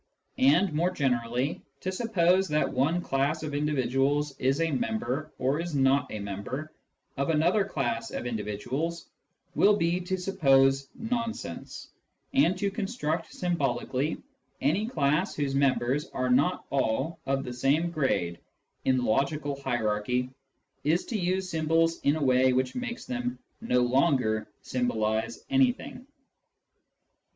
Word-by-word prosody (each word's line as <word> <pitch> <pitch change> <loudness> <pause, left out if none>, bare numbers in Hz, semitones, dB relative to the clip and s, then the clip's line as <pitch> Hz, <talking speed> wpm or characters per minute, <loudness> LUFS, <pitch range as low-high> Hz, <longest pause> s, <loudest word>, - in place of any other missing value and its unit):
And 150 +7 +4
more 170 +4 +2
generally, 125 -2 -1 0.2
to 185 - -2
suppose 190 -3 +2
that 150 0 0
one 155 +7 +1
class 140 +2 0
of 150 -2 -4
individuals 145 0 +1
is 135 +3 +1
a 165 -1 +1
member, 125 +4 -2
or 135 +4 0
is 170 -2 -3
not 135 0 +3
a - - -4
member, 105 +10 -5 0.4
of 140 +2 0
another 170 +6 +3
class 120 - -2
of - - -5
individuals 120 +9 -3 0.5
will 210 +1 +5
be 170 -1 +1
to 185 +1 -2
suppose 135 -7 +3
nonsense; 230 - -4 0.4
and 165 +7 +3
to 200 +1 0
construct 195 -6 -2
symbolically 145 -4 -1 0.4
any 175 +11 +1
class 155 - +1
whose 140 -2 -1
members 135 0 +1
are 130 0 -1
not 140 +8 +2
all 140 +5 0
of 135 0 0
the 125 - -5
same 145 +7 +1
grade 90 - 0 0.5
in 130 -1 +3
the 125 - 0
logical 140 +4 0
hierarchy 125 0 -1 0.5
is 160 +5 +1
to 235 - -4
use 185 -1 0
symbols 165 0 +1
in 145 - +2
a 155 - -1
way 130 -1 +4
which 130 0 0
makes 245 -1 -5
them 245 0 -3 0.2
no 125 - +2
longer 125 -4 +2 0.2
symbolise 110 -2 -1
anything. 260 -1 +1
145 Hz, 135 wpm, -28 LUFS, 130-170 Hz, 0.5 s, will